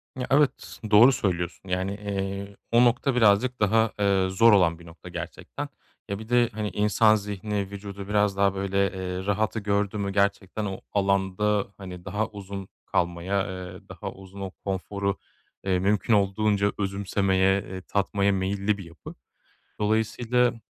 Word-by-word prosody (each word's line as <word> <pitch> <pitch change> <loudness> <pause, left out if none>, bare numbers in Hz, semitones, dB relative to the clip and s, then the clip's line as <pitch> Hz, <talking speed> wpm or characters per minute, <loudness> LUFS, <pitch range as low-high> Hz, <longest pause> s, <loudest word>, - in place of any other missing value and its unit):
Ya, 125 -1 -4
evet 145 0 +1
doğru 115 +5 +8
söylüyorsun. 90 -7 -2
Yani, 90 +1 -1
eee, 100 -1 -4 0.2
o 120 +1 +6
nokta 125 +2 +2
birazcık 120 +2 +3
daha, 110 +2 +3
eee, 100 -2 +3
zor 115 +5 +5
olan 85 -4 +4
bir 85 - -14
nokta 85 0 -12
gerçekten. - - -6 0.4
Ya, 100 0 -3
bir 110 +1 -10
de, 120 -1 +4
hani, 105 0 -2
insan 105 +2 +4
zihni 100 -1 -3
vücudu 100 -1 -7
biraz 105 -1 +1
daha 100 0 +3
böyle, 95 0 -2
eee, 95 0 -4
rahatı 105 +2 0
gördü 100 0 0
mü 100 -1 -2
gerçekten 100 +1 0
o 95 -2 -5
alanda, 100 +1 +1
hani, 90 -2 -9
daha 105 +4 -1
uzun 100 -2 -8 0.2
kalmaya, 90 +3 0
eee, 95 -2 -7
daha - - -6
uzun 95 +1 -12
o 95 -1 -4
konforu, 100 0 -2 0.5
eee, 95 -2 +1
mümkün 100 +4 +2
olduğunca 100 0 +2
özümsemeye, 95 -1 +1
eee, 95 0 -8
tatmaya 100 +1 +1
meyilli 100 +2 0
bir 100 - -8
yapı. 85 -1 -11 0.7
Dolayısıyla, 115 +3 +1
100 Hz, 150 wpm, -26 LUFS, 95-105 Hz, 0.7 s, doğru